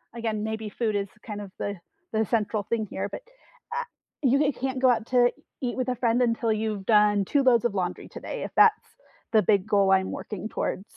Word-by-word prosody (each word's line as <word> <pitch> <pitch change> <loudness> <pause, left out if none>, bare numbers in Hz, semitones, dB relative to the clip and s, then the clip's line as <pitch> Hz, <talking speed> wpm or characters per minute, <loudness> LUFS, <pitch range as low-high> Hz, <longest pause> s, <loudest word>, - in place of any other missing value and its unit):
again, 220 -2 -2
maybe 220 0 -3
food 215 +1 -1
is 200 0 -1 0.2
kind 210 -2 -5
of 200 -2 -9
the 205 0 -3 0.4
the 220 0 +2
central 215 -1 0
thing 225 -2 0
here, - - -3
but, - - -6 0.6
uh, - - -1 0.4
you 275 +3 +3
can't 260 0 -3
go 260 - +6
out 230 -2 +2
to 245 -1 +5
e - - -2 0.3
eat 245 -2 -2
with 255 0 -1
a 250 - 0
friend 235 +1 +1
until 230 -1 +1
you've 215 -2 -3
done 210 -2 +4
2 280 +7 +2
loads 240 -2 +4
of 225 - +1
laundry 180 -3 -3
today, - - -6
if - - -5
that's 435 -1 +5 0.5
the 215 - +6
big 200 0 +2
goal 200 -2 +3
I'm 190 0 +3
working 210 0 -6
towards. 190 - -2
220 Hz, 215 wpm, -26 LUFS, 205-245 Hz, 0.6 s, go